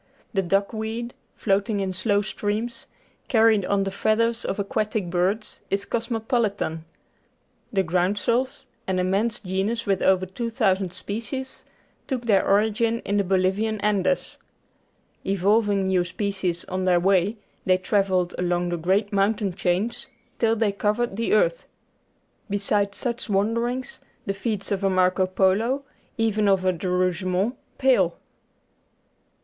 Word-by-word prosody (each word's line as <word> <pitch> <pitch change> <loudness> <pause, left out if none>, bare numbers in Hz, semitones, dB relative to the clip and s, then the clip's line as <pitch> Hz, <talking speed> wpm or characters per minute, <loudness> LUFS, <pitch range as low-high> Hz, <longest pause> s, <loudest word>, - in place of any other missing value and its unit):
The 195 - +2
duckweed, 220 +5 -1 0.2
float 200 0 +1
ing 210 -2 0
in 190 -1 -1
slow 205 +2 +1
streams, 215 +3 -3 0.4
carried 220 -3 +4
on 200 0 +1
the 195 - -2
feathers 230 +3 +1
of - - -2
aquatic 205 -2 -1
birds, 190 +5 -1
is 200 +1 -1
cosmopolitan. 225 -8 -1 0.9
The 195 -2 +2
groundsels, 205 +9 0 0.2
an 190 -1 0
immense 195 +6 0
genus 200 +5 -1
with 195 -2 +1
over 185 -1 +3
2,000 195 -2 0
species, 230 +8 -6 0.4
took 255 -3 -2
their 205 -4 +4
origin 220 +3 +2
in 200 - -1
the 200 - +3
Bolivian 195 +4 +1
Andes. 210 +5 0 0.8
Evolving 200 +1 +2
new 185 -2 +2
species 185 -1 -2
on 185 0 -3
their 180 -1 +4
way, 195 +3 +2 0.3
they 185 -1 +4
travelled 185 -1 +1
along 175 0 0
the 175 - -1
great 195 +5 +1
mountain 200 0 +1
chains 185 +6 -1 0.3
till 225 -1 +3
they 220 -2 +1
covered 210 +2 0
the 230 +2 0
earth. - - +2 0.8
Beside 200 0 +1
such 240 -1 -3
wanderings 230 +5 0 0.2
the 195 - -1
feats 210 -1 -3
of 200 -1 -1
a 195 - +3
Marco 185 0 +2
Polo, 205 +9 +2 0.3
even 215 -2 +1
of 190 -2 +3
a 185 - +3
De 180 +2 -4
Rougemont, 185 +4 0 0.2
pale. 220 -11 +3
200 Hz, 135 wpm, -24 LUFS, 185-225 Hz, 0.9 s, carried